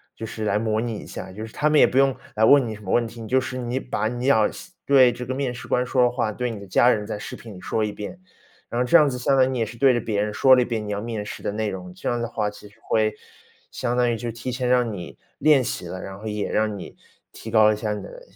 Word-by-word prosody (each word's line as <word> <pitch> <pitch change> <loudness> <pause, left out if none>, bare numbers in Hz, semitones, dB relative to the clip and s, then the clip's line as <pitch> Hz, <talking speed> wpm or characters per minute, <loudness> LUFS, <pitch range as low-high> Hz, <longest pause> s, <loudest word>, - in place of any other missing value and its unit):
就 115 - -6
是 110 0 -6
来 105 0 +1
模 110 0 0
拟 115 -2 -3
一 - - -10
下， 95 - -7
就 110 +3 -6
是 110 - -13
他 150 - +1
们 150 -1 +4
也 - - +8
不 130 - -2
用 135 0 +4 0.2
来 110 - +1
问 135 +1 +6
你 110 - -4
什 105 - -13
么 95 - -4
问 120 - +3
题， 115 +1 -10
你 110 - -7
就 130 +4 +3
是 130 0 -5
你 125 +1 -2
把 125 -4 -2
你 120 +1 -4
要 110 -6 +4
向 170 - -11 0.2
对 130 -3 +6
这 125 +1 -7
个 130 +2 -3
面 135 -2 -2
试 120 - -9
官 125 0 +1
说 125 0 +1
的 125 - +4
话， 120 -3 -1
对 125 +3 -2
你 110 - -7
的 100 - -10
家 120 +6 +4
人 105 -4 +1
在 - - -4
视 - - -7
频 115 -3 -11
里 90 - -11
说 110 - -1
一 105 - -3
遍。 105 - -7 0.5
然 120 - -1
后 - - +1
这 125 - +6
样 150 -3 +5
子 125 - -4
相 135 +2 +2
当 130 - +6
于 - - -1
你 130 -2 -2
也 115 - +1
是 115 +2 -10
对 135 +1 +5
着 120 - 0
别 105 -2 -1
人 105 0 -2
说 130 +5 +5
了 125 - +3
一 - - +1
遍 115 -3 -3
你 - - -3
要 100 - -2
面 110 -2 -4
试 - - -7
的 - - -1
内 110 0 -1
容， 90 -2 -7
这 95 - -4
样 120 -1 -1
的 120 - -2
话， 105 -3 -1
其 105 0 -13
实 100 - -24
会 110 -1 +1 0.6
相 120 -1 -2
当 120 -1 +3
于 115 - -1
就 115 +2 -4
提 120 +3 -5
前 125 0 -2
让 125 -2 +3
你 90 -3 -8 0.2
练 145 -3 +5
习 100 - -4
了， 95 +2 -6
然 95 0 -8
后 110 - -7
也 105 -1 -3
让 110 -1 0
你 90 - -10 0.4
提 110 - -9
高 110 -1 +6
一 - - -4
下 105 0 -2
你 105 - -6
的 - - -11
115 Hz, 345 characters per minute, -23 LUFS, 105-125 Hz, 0.6 s, 也